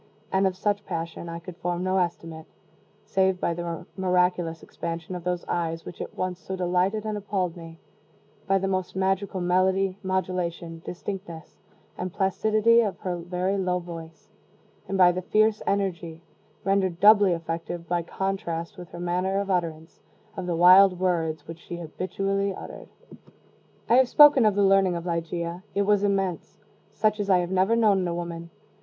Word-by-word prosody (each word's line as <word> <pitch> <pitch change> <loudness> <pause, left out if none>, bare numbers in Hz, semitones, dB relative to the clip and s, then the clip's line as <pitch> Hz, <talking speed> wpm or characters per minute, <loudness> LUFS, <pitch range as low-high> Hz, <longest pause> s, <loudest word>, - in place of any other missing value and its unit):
And 190 0 +3
of 185 - -2
such 205 +1 -1
passion 165 -1 -5
I 165 - -5
could 170 +1 -10
form 175 0 -2
no 185 +1 +1
estimate, 165 -2 -4 0.6
save 190 -3 +1
by 170 - 0
the 170 -1 -5
miraculous 180 -3 0
expansion 165 +1 -6
of 180 -1 -6
those 180 0 -2
eyes 165 -1 -2
which - - -8
at - - -7
once 185 -1 -2
so 190 +3 -6
delighted 185 +4 0
and 215 -1 -2
appalled 190 -4 -2
me, 165 -1 -11 0.7
by 195 0 +3
the 195 - -2
almost 185 -2 -2
magical 190 0 0
melody, 185 +2 +1
modulation, 180 -3 -3
distinctness, 180 -2 -7 0.4
and 180 0 -3
placidity 215 +4 +3
of 205 -4 -2
her 180 -2 -2
very 180 +3 -2
low 180 -1 0
voice, 165 -2 -9 0.6
and 195 - -2
by 180 -1 +7
the 180 +1 -3
fierce 215 +3 +2
energy 175 -4 -2 0.4
(rendered 190 -3 +1
doubly 205 -2 +6
effective 165 +1 -5
by 175 -1 0
contrast 170 -2 -4
with 175 - -9
her 175 - -9
manner 180 +2 0
of 200 -1 -2
utterance) 165 -3 -3 0.4
of 185 -2 -5
the 175 - 0
wild 180 +2 +7
words 160 -4 -1
which 165 0 -8
she 175 - -8
habitually 195 +4 -2
uttered. - - -9 1.0
I 235 - +5
have 260 -1 +4
spoken 290 -5 +7
of 210 - +2
the 205 - +3
learning 195 -2 +4
of 170 0 -5
Ligeia: 170 0 -3
it 200 - +2
was 205 0 +2
immense 195 -4 -1 0.3
such 215 0 0
as 200 -1 -2
I 185 - +6
have 175 0 -2
never 190 +4 +3
known 215 -4 +4
in 170 - -2
woman. 170 -1 -6
180 Hz, 170 wpm, -26 LUFS, 170-195 Hz, 1.0 s, by